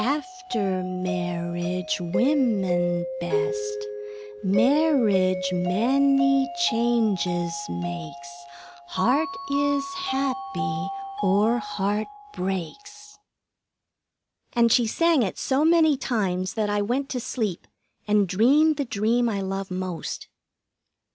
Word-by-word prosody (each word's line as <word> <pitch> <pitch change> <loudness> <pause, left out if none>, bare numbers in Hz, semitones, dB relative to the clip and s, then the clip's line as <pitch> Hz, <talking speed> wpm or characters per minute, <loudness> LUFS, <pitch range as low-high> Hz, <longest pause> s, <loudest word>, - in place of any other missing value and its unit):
After 280 - -2
marriage, 185 +1 -3
women 180 -5 +1
best. 105 -11 -1 0.7
Marriage 195 -7 +3
many 265 - +3
changes 215 - +1 0.2
makes 170 -5 -6 0.6
Heart 260 - +1 0.2
is 280 0 +1
happy 155 - -2 0.3
or 210 +5 +3
heart 210 0 -2 0.3
breaks." 405 - -6 1.3
And 235 -1 +3
she 240 -1 +4
sang 330 +4 +3
it 195 -5 -2
so 270 +2 +1
many 320 -2 +5
times 190 -8 -1
that 215 -2 0
I 205 0 +1
went 250 +7 -1
to 255 - -2
sleep 220 -7 -3 0.4
and 210 -1 +3
dreamed 280 - +4
the 285 - -1
dream 230 +2 +1
I 200 -3 -2
love 195 0 -4
most. 185 -3 -5
210 Hz, 95 wpm, -25 LUFS, 180-270 Hz, 1.3 s, many